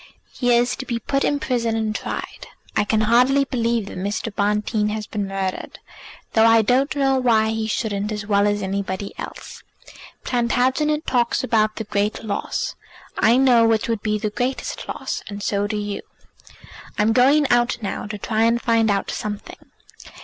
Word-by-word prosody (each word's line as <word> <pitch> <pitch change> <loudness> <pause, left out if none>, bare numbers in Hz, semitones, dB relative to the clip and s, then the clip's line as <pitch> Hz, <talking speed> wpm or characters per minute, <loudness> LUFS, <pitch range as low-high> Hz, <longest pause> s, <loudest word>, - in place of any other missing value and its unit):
He 245 -2 0
is 245 +1 +1
to 265 - -6
be 235 - -1
put 275 +5 -1
in 290 - +1
prison 235 -5 -1
and 220 -1 -1
tried. - - -5 0.3
I - - +3
can 215 +1 +1
hardly 250 +5 +4
believe 235 -4 0
that 195 - -7
Mr. 205 +3 -3
Bonteen 210 +1 0
has 215 0 -3
been 205 -1 -3
murdered, 195 -1 -4 0.6
though 225 0 +5
I 225 -1 +5
don't 260 +7 +2
know 270 -2 +2
why 225 -3 +3
he 220 0 -2
shouldn't 210 -2 -2
as 210 -1 -4
well 200 0 +3
as 205 0 0
anybody 195 0 -3
else. - - -8 0.6
Plantagenet 260 +5 +1
talks 240 -2 +1
about 215 -2 +1
the 220 - -4
great 210 +1 -2
loss; 205 -2 -3 0.4
I 230 +3 +5
know 245 -4 +5
which 225 +2 +1
would 225 -3 -1
be 215 -1 0
the 210 0 -3
greatest 250 +4 -3
loss, - - -4
and 200 0 -6
so 200 0 0
do 210 0 -3
you. 205 -1 -4 1.0
I'm 215 +2 +3
going 275 +5 +4
out 240 0 +3
now 200 - -4
to 210 0 -5
try 220 +2 -1
and 230 +1 +2
find 230 -2 +2
out 200 -1 0
something. 210 -1 -6
220 Hz, 175 wpm, -22 LUFS, 210-245 Hz, 1.0 s, though